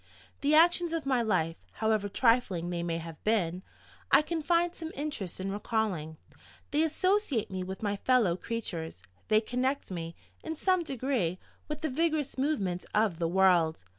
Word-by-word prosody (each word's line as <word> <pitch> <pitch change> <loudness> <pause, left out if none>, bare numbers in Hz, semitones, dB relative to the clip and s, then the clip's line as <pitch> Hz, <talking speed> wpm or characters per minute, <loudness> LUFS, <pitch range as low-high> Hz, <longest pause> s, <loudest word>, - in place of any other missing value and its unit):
The 290 +2 +3
actions 345 +1 +4
of 325 -3 -2
my 260 -3 +2
life, 175 -7 0 0.2
however 215 -2 0
trifling 205 -7 +2
they 170 -1 -2
may 170 -1 -1
have 165 -1 -9
been, 185 -5 +1 0.5
I - - +7
can 325 +1 -2
find 340 +2 +2
some 325 -2 -7
interest 270 - -4
in 190 +1 -3
recalling: 200 -7 -2 0.5
they 295 - +2
associate 320 - +1
me 185 -1 -3
with 190 +3 -7
my 205 -1 0
fellow 225 -6 +3
creatures; 175 - -5 0.2
they 215 0 +4
connect 255 +2 -1
me, 165 -2 -5 0.3
in 320 0 -4
some 370 +2 +2
degree, 255 - -1 0.3
with 300 0 -5
the 315 - -1
vigorous 310 -1 0
movement 230 - -1
of 210 -6 +2
the 165 - +1
world. 175 - +3
220 Hz, 165 wpm, -30 LUFS, 180-300 Hz, 0.5 s, I